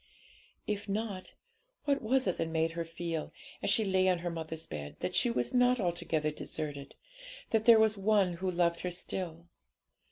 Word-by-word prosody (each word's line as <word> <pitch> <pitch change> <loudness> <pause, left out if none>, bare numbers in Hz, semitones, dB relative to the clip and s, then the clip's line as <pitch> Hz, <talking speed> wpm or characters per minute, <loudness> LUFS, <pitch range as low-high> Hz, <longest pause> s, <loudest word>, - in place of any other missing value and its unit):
If 205 0 -3
not, 200 -2 -3 0.5
what 280 -1 +2
was 260 +3 +2
it 185 - 0
that 165 - 0
made 160 0 +1
her 170 0 -3
feel, 165 -1 -4 0.3
as - - 0
she 220 - +3
lay 190 -1 +3
on 180 - +3
her 175 - 0
mother's 160 -1 -5
bed, 75 -2 -6
that - - -2
she - - +3
was 120 +1 -1
not 250 0 +4
altogether 165 -4 0
deserted, 145 -2 -5 0.6
that 220 -1 +2
there 235 -2 +9
was 220 -1 +3
One 195 -3 +3
who 185 +2 -2
loved 170 -1 +1
her 180 - -2
still? 175 -1 -5
180 Hz, 180 wpm, -32 LUFS, 165-210 Hz, 0.6 s, there